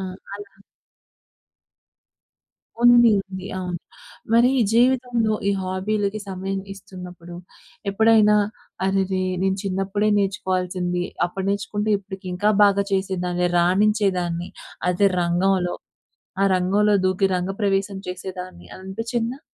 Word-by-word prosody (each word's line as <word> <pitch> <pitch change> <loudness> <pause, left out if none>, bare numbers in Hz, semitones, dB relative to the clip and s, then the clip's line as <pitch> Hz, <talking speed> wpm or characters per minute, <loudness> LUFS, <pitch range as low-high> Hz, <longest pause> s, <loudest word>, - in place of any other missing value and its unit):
ఆ! - - -4 0.3
అలా. 205 0 -10 2.3
ఉంది 240 -1 +7
ఉంది. 190 -1 -8
అవును. 180 -2 -4 0.5
మరి 235 +2 +5 0.2
జీవితంలో 240 -2 +2
ఈ - - +4
హాబీలకి 200 +3 -2
సమయం 195 +1 -3
ఇస్తున్నప్పుడు, 180 -3 -11 0.6
ఎప్పుడైనా, 215 0 +5 0.5
"అరెరే! 190 -1 0 0.2
నేను 190 0 +1
చిన్నప్పుడే 195 +2 -1
నేర్చుకోవాల్సింది. 185 -2 -1 0.2
అప్పుడు 190 +2 -5
నేర్చుకుంటే 205 +1 -2
ఇప్పటికి 190 -1 -10
ఇంకా 205 +4 +2
బాగా 200 0 +3
చేసేదాన్ని, 180 -2 0
రాణించేదాన్ని 180 -2 +1 0.4
అదే 195 +3 +3
రంగంలో. 180 +1 +1 0.7
ఆ - - +4
రంగంలో 200 +3 +2
దూకి 185 +1 +2
రంగప్రవేశం 195 +1 -1
చేసేదాన్ని" 185 0 -7
అని 185 - -11
అనిపించిందా? 230 +5 -3
195 Hz, 100 wpm, -22 LUFS, 185-210 Hz, 2.3 s, ఉంది